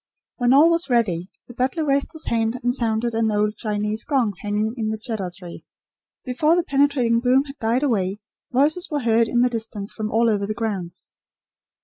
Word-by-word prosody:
When 245 -1 +2
all 300 +5 +6
was 335 -2 0
ready, 195 -8 +1 0.2
the 245 - -11
butler 265 +6 -1
raised 280 -1 0
his 315 - -3
hand 225 +1 0
and 245 0 +1
sounded 235 -1 -1
an 225 0 +1
old 210 +1 0
Chinese 210 0 -2
gong 260 -8 +1
hanging 210 +2 -1
in 220 -3 -2
the 220 0 -3
cedar 215 -5 -4
tree. 175 -3 -10 0.6
Before 300 +6 +2
the 350 - +1
penetrating 275 -6 +2
boom 255 +3 +3
had 285 0 -12
died 230 +4 0
away, 200 -7 0 0.3
voices 305 +8 +2
were 295 -3 -2
heard 230 -1 +3
in 240 - +1
the 250 - +4
distance 220 -3 -3
from 215 -1 -4
all 230 +2 +2
over 205 -3 0
the 215 - -3
grounds. 200 -7 -5
230 Hz, 195 wpm, -22 LUFS, 215-270 Hz, 0.6 s, all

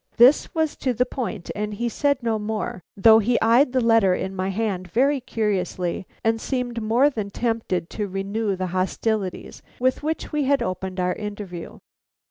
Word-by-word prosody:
This 250 +8 +5
was 315 -2 0
to 255 -2 -1
the 250 - +2
point 235 -8 -5
and 210 0 -3
he 235 +3 -1
said 280 +2 0
no 225 -2 0
more, 220 +1 -3 0.2
though 220 +3 +7
he 235 +3 +2
eyed 240 +5 +4
the 260 - +2
letter 225 -5 +4
in 190 +1 -4
my 190 0 -1
hand 195 -3 -2
very 270 - +2
curiously, 190 -6 -2 0.2
and 225 0 +1
seemed 245 -3 -2
more 230 +6 +3
than 215 -6 -4
tempted 220 -7 -1
to 210 -2 -3
renew 200 +2 -2
the 185 0 -3
hostilities 190 +1 -2 0.2
with 255 +1 +1
which 315 +2 -3
we 300 -2 0
had 280 +1 +2
opened 185 0 -4
our 180 0 +1
interview. 205 -5 -7
220 Hz, 175 wpm, -23 LUFS, 195-245 Hz, 0.2 s, though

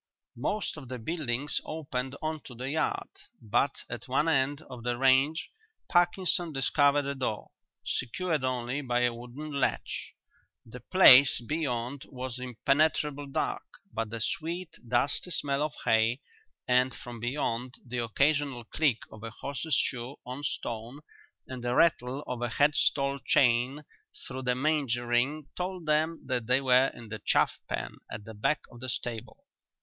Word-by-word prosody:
Most 210 -6 -2
of 140 -4 -9
the 130 - -4
buildings 140 0 -2
opened 135 -4 -4
on 155 -1 -2
to 125 - -9
the 130 +3 -4
yard, 155 - -1 0.3
but 115 +6 0
at 115 +1 -7
one 135 +5 +2
end 145 0 +1
of 125 -2 -10
the 120 +1 -1
range 135 +5 +3 0.4
Parkinson 175 -1 +2
discovered 145 +1 +3
a 140 - -1
door, 125 -6 -3 0.3
secured 155 +4 -1
only 130 +2 -1
by 125 -3 0
a 120 -1 +2
wooden 125 +6 -8
latch. 140 -1 -2 0.5
The 120 +2 -10
place 135 -2 +7
beyond 130 -1 -2
was 130 -1 -5
impenetrably 145 +3 +1
dark, - - -1 0.3
but 115 -1 -2
the 115 +1 -5
sweet, 170 +8 -2 0.2
dusty 130 +8 +1
smell 140 -3 0
of 150 0 -1
hay, 110 +3 +3 0.5
and, 125 0 +3
from 120 -1 -8
beyond, 125 0 -2
the 125 0 -3
occasional 140 +1 +1
click 135 0 +1
of 110 - -11
a 115 - -5
horse's 140 +6 -2
shoe 125 +1 -1
on 125 +3 -6
stone 120 -1 -4 0.5
and 130 -2 -7
the 120 0 0
rattle 140 -4 +3
of 125 -1 -4
a 120 - 0
head 145 +6 +3
stall 140 -1 +2
chain 125 +3 +3 0.4
through 130 0 -5
the 125 -1 +1
manger 135 -4 +1
ring 130 +5 +1
told 180 -1 -4
them 155 +2 +1
that 125 -4 -2
they 125 +1 +4
were 130 0 +5
in 115 -2 -10
the 110 -1 -6
chaff - - +2
pen - - -3
at 105 - -6
the 110 - -8
back 110 +8 0
of 120 - -12
the 130 +1 -5
stable. 115 0 -5
130 Hz, 155 wpm, -29 LUFS, 120-150 Hz, 0.5 s, place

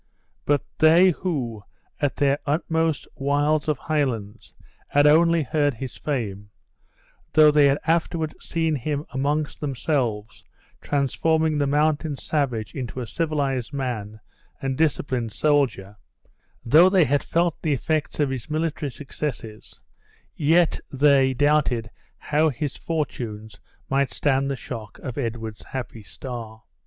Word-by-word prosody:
But 145 -1 +2 0.2
they 170 +4 +6
who, 130 - -3 0.4
at 145 -2 +1
their 140 0 +2
utmost 160 0 0
wilds 145 +2 +1
of 150 -3 +1
Highlands, 120 -7 -3 0.3
had 145 0 +3
only 165 +2 +5
heard 145 0 +1
his 130 +2 -6
fame; 105 -8 -4 0.8
though 155 -1 +7
they 145 -1 +5
had 140 +1 +3
afterward 165 -1 0
seen 165 -1 -1
him 145 +2 -2
amongst 145 +3 -1
themselves, 125 -6 -2 0.4
transforming 155 +2 +1
the 145 - +1
mountain 150 +1 +1
savage 125 -9 -2
into 130 -2 -5
a 125 - -3
civilized 140 -3 -2
man 110 -6 -4 0.4
and 135 -2 -2
disciplined 130 -6 0
soldier; 120 -9 +1 0.7
though 160 +10 +7
they 190 -2 +5
had 145 +2 +1
felt 170 -1 0
the 155 - +1
effects 155 +3 -1
of 145 -3 +2
his 130 +2 -5
military 155 -1 -2
successes; 130 -5 -6 0.5
yet 165 +2 +3
they 135 -1 +4
doubted 135 -5 +2 0.3
how 155 +2 +1
his 145 0 -4
fortunes 115 -9 -4 0.3
might 140 0 +1
stand 135 -1 +1
the 140 - -1
shock 115 -4 -8
of 130 0 -5
Edward's 115 -3 -4
happy 125 -3 -6
star. 110 +3 -8
140 Hz, 125 wpm, -24 LUFS, 120-155 Hz, 0.8 s, though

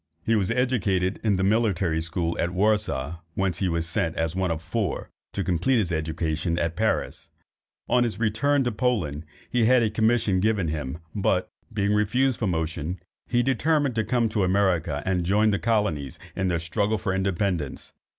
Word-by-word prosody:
He 115 - +3
was 100 -4 +1
educated 105 -7 +1
in 105 -3 +2
the 95 - 0
military 95 -6 +1
school 85 +1 -2
at 85 - +1
Warsaw, 95 -8 +1 0.2
whence 95 -3 0
he 95 - +1
was 85 -1 -1
sent, 85 0 0
as 80 +1 -1
one 95 -1 0
of 80 -1 -1
four, 90 +3 -3 0.2
to 100 - -1
complete 95 +9 +1
his 95 -6 0
education 80 +1 -1
at 85 -1 -1
Paris. 110 +4 -1 0.6
On 125 -1 +3
his 115 -3 -2
return 125 +6 +2
to 120 - 0
Poland, 105 - -1 0.3
he 120 -2 +3
had 125 +1 +5
a 110 - +1
commission 110 -3 +2
given 100 -4 +1
him, 75 -2 -3 0.2
but, 95 -3 0 0.2
being 105 -1 +1
refused 120 +5 +2
promotion, 85 -3 -2 0.3
he 120 0 +2
determined 140 +2 +1
to 110 -1 0
come 120 0 +1
to 105 -2 0
America, 90 -6 +1
and 95 -2 +1
join 105 +4 +3
the 100 - 0
colonies 105 - 0 0.2
in 95 - 0
their 85 -2 +1
struggle 100 +6 0
for 95 -1 -2
independence. 95 -5 -2
95 Hz, 175 wpm, -25 LUFS, 85-110 Hz, 0.6 s, had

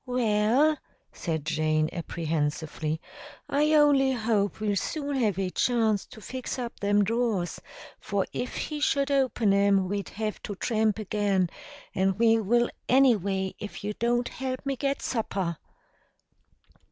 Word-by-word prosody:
"Well," 245 +5 +2 0.3
said 160 -4 -3
Jane 155 0 +1
apprehensively, 160 -2 -2 0.5
"I 300 +2 +2
only 280 -3 +5
hope 220 -4 0
we'll 210 -1 0
soon 285 - -2
have 215 -7 +1
a 190 -2 -1
chance 225 -4 +1
to - - -13
fix 255 +5 -5
up 240 -2 -5
them 205 0 +3
drawers, 220 -5 -1 0.4
for 200 -2 -1
if 250 - -3
he 300 -1 -3
should 280 -1 +1
open 250 -6 +2
'em 200 -1 +3
we'd 200 +1 -3
have 215 0 -4
to 205 - -5
tramp 220 0 +1
again, 200 -4 0 0.4
and 190 0 +1
we 225 0 +4
will 240 +3 +2 0.2
anyway 200 -8 +3
if 210 - -7
you 210 +1 -2
don't 240 +2 0
help 260 +1 -4
me 275 -1 0
get 275 +2 -2
supper." 195 -8 -2
215 Hz, 140 wpm, -27 LUFS, 195-250 Hz, 0.5 s, only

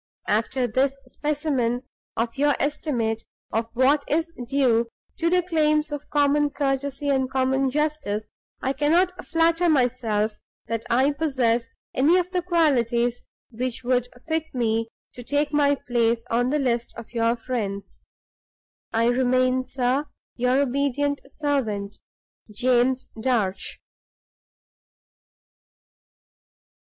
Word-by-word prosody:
After 230 +4 +1
this 265 +4 +1
specimen 265 -4 -1 0.3
of 230 0 -1
your 290 +1 +3
estimate 240 -7 -1 0.3
of 225 +1 0
what 275 +4 +4
is 330 +2 0
due 235 -4 +2 0.3
to 335 - +1
the 360 0 +3
claims 305 -3 +1
of 295 0 -6
common 290 0 +3
courtesy 280 0 -1
and 265 -2 +1
common 265 0 +1
justice, 285 -7 -1 0.4
I 265 - +1
cannot 340 +6 +2
flatter 335 +1 +2
myself 230 -6 +1 0.3
that 230 0 -3
I 260 +4 +3
possess 260 -6 +1 0.3
any 300 +7 +4
of 360 0 -1
the 365 -1 0
qualities 245 -9 +1 0.2
which 250 +2 -3
would 250 0 +1 0.2
fit 320 0 0
me 225 -2 +1 0.3
to 245 - -9
take 290 +4 0
my 285 -1 +4
place 235 -3 0
on 245 +2 +2
the 295 - +1
list 240 -4 -1
of 235 0 -10
your 230 0 +2
friends. 210 -5 -4 0.9
"I 225 +1 +2
remain, 255 +1 +2
sir, 260 +3 0 0.3
your 250 +2 +2
obedient 280 +1 0
servant, 225 -10 -2 0.5
"JAMES 250 +3 +2
DARCH." 220 -7 -1
260 Hz, 115 wpm, -24 LUFS, 235-290 Hz, 0.9 s, what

